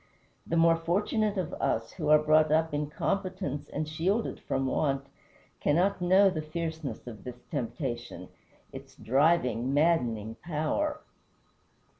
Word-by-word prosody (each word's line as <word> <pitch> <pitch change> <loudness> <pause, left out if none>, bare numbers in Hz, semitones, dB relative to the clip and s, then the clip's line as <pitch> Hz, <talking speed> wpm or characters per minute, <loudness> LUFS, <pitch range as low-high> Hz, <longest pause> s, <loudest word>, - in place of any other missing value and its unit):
The 170 - 0
more 165 0 +5
fortunate 205 +5 0
of 180 -4 -2
us, 115 - 0
who 155 -5 -3
are 155 - +8
brought 155 0 +3
up 160 0 +2
in 145 0 -1
competence 185 -4 -3
and 155 +1 -3
shielded 180 +9 -1
from 135 0 -2
want, 135 0 0 0.5
cannot 180 +6 +2
know 190 +2 +5
the 160 -4 -3
fierceness 160 -1 -5
of 115 -4 -9
this 125 -1 -9
temptation 120 - -4 0.4
its - - -10
driving, 135 -2 +2
maddening 120 -9 +1
power. 175 - -1
155 Hz, 130 wpm, -29 LUFS, 135-175 Hz, 0.5 s, are